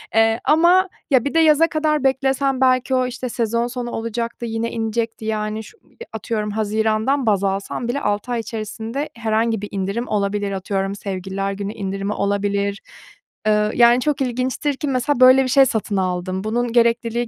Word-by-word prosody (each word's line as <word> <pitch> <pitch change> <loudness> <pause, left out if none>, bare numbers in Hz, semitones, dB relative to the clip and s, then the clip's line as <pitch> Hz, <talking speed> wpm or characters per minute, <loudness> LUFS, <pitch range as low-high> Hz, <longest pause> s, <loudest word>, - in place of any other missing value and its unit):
Eee, 225 +1 +3
ama 350 +4 +4 0.2
ya 260 -2 +4
bir 280 - -2
de 330 - +3
yaza 320 0 +5
kadar 305 -3 0
beklesem 270 0 +1
belki 255 0 +3
o, 255 0 +1
işte, 250 0 -5
sezon 235 0 -1
sonu 245 -1 -5
olacaktı, 230 +1 -4
yine 230 0 -3
inecekti, 225 0 -3
yani, 215 0 -2
şu 440 - -15
i 470 - -14
atıyorum 215 0 -3
hazirandan 220 +5 0
baz 200 -3 +2
alsam 195 +4 -2
bile 280 +4 -2
6 205 +4 -2
ay 240 - 0
içerisinde 225 +5 -5
herhangi 225 -1 0
bir 205 - -5
indirim 200 +5 -3
olabilir, 205 0 -1
atıyorum 195 0 -2
Sevgililer 195 0 -4
Günü 200 +1 -5
indirimi 195 -1 -3
olabilir. 200 0 -1 0.7
Eee, 210 0 +2
yani, 240 +1 +6
çok 290 0 -1
ilginçtir 255 +3 -1
ki 295 - -3
mesela 255 +1 0
böyle 255 +1 +7
bir - - -2
şey 270 +1 +6
satın 220 -5 -1
aldım. 185 +1 -2
Bunun 235 +2 -1
gerekliliği 235 0 +2
230 Hz, 170 wpm, -20 LUFS, 205-255 Hz, 0.7 s, böyle